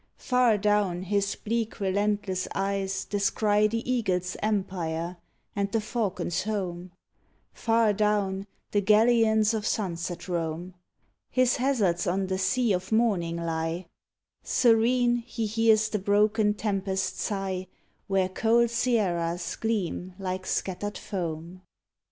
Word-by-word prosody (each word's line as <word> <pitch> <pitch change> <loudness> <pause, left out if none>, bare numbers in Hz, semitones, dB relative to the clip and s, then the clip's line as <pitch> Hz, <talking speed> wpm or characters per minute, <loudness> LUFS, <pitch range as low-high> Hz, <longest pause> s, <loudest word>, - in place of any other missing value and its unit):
Far 250 -4 +3
down 205 -3 +1
his 200 +1 0
bleak, 230 +1 -3
relentless 200 -1 0
eyes 195 0 -1
descry 205 +1 +2
The 230 +2 -3
eagle's 185 -8 0
empire 180 -5 -2 0.4
and 200 0 -1
the 225 - +1
falcon's 210 -6 -2
home 185 -4 -3 0.3
— - - -40 0.2
Far 225 -2 +2
down, 200 -2 0 0.2
the 205 - +2
galleons 220 +1 +4
of 220 0 -2
sunset 175 -4 -3
roam; 170 0 -3 0.6
His 255 -1 +2
hazards 220 -11 +1
on 190 +2 +1
the 190 0 -2
sea 240 +2 +2
of 185 +2 -3
morning 200 -7 +2
lie; 165 +1 -2 0.6
Serene, 240 +1 +3
he 230 -1 -4
hears 220 0 +3
the 210 - -1
broken 210 +2 +2
tempest 195 -3 -2
sigh 190 -2 -2 0.4
Where 195 -1 +2
cold 230 +4 +2
sierras 175 -8 0
gleam 190 -4 -2
like 185 -1 -4
scattered 205 +2 -2
foam. 175 -1 -5
200 Hz, 120 wpm, -27 LUFS, 185-220 Hz, 0.6 s, galleons